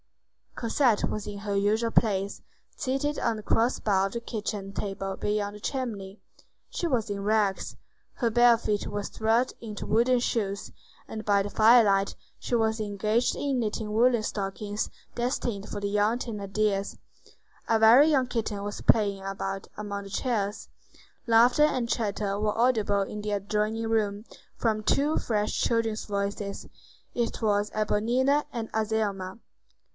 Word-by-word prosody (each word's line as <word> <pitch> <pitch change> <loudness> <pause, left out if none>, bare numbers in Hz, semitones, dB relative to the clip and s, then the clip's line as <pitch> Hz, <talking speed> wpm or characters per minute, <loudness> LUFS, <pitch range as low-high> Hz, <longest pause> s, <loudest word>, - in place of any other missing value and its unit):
Cosette 235 -1 +1
was 210 -1 -4
in 205 -1 -6
her 200 -1 -3
usual 215 +3 +1
place, 200 -3 +1 0.3
seated 290 +2 -1
on 225 - 0
the 215 - -8
cross 230 +4 +1
bar 195 -2 +2
of 195 - -10
the 235 - -2
kitchen 210 -4 -5
table 195 -1 -4
near 210 -1 0
the 210 - -11
chimney. 210 -6 -4 0.5
She - - -2
was 240 -8 0
in 200 -1 -3
rags; 210 -2 0 0.4
her 235 - 0
bare 240 0 +6
feet 210 -3 -2
were 205 0 -3
thrust 225 +5 +1
into 215 -3 -6
wooden 240 +3 +3
shoes, 200 -5 -2 0.4
and 215 -1 -6
by 200 -1 +3
the 205 - -4
firelight 215 -3 +5 0.2
she - - -6
was 220 -1 +1
engaged 215 +3 0
in 275 -3 -1
knitting 215 -1 -2
woollen 240 +1 +4
stockings 205 0 -3 0.3
destined 240 -4 -2
for 205 - -4
the 200 0 -2
young 210 +3 +2
Thénardiers. 205 -3 -2 0.7
A 225 - +3
very 240 +8 +7
young 265 -4 +2
kitten 215 -4 -3
was 205 0 -5
playing 200 -3 +2
about 195 0 -4
among 200 -1 -4
the 200 - -10
chairs. 210 -2 -2 0.6
Laughter 235 +5 +5
and 255 -6 +2
chatter 205 -3 -1
were 210 0 0
audible 220 -4 +2
in 210 +2 -4
the 210 0 -3
adjoining 210 +2 -1
room, 210 -1 0 0.3
from 215 -2 0
two 290 +7 +2
fresh 210 -2 -1
children's 225 -2 0
voices: 200 0 -3 0.5
it 235 -1 -2
was 205 -1 +1
Éponine 240 +7 +1
and 225 -2 -5
Azelma. 215 -3 -1
215 Hz, 150 wpm, -27 LUFS, 200-235 Hz, 0.7 s, very